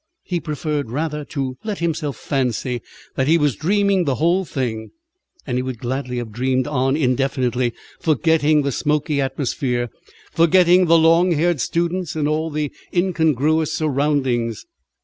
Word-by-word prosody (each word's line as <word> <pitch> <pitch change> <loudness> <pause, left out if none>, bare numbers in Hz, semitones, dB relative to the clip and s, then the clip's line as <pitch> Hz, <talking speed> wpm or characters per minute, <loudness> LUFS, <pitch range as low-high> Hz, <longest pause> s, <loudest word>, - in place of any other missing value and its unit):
He 175 -2 -2
preferred 150 -4 -3
rather 150 +3 -3
to 135 -4 -4
let 210 -2 -3
himself 160 -5 -2
fancy 125 -3 -2 0.3
that 130 - 0
he 165 +2 +5
was 145 -6 +1
dreaming 200 - +1
the 135 -3 +1
whole 175 +6 +2
thing; 120 -8 -3 0.6
and 125 - -1
he - - 0
would 130 -1 -4
gladly 125 +2 -3
have 120 -2 -4
dreamed 130 +3 0
on 135 -1 0
indefinitely, 130 -3 0 0.2
forgetting 155 -2 +2
the 140 - 0
smoky 150 +1 0
atmosphere, 130 -3 -2 0.4
forgetting 175 +2 +4
the 165 0 +6
long 165 +2 +4
haired 165 -2 +1
students 170 +2 -1
and 150 -2 0
all 155 +2 0
the 150 -2 -2 0.2
incongruous 160 -4 +1
surroundings. 135 - 0
150 Hz, 145 wpm, -20 LUFS, 130-165 Hz, 0.6 s, the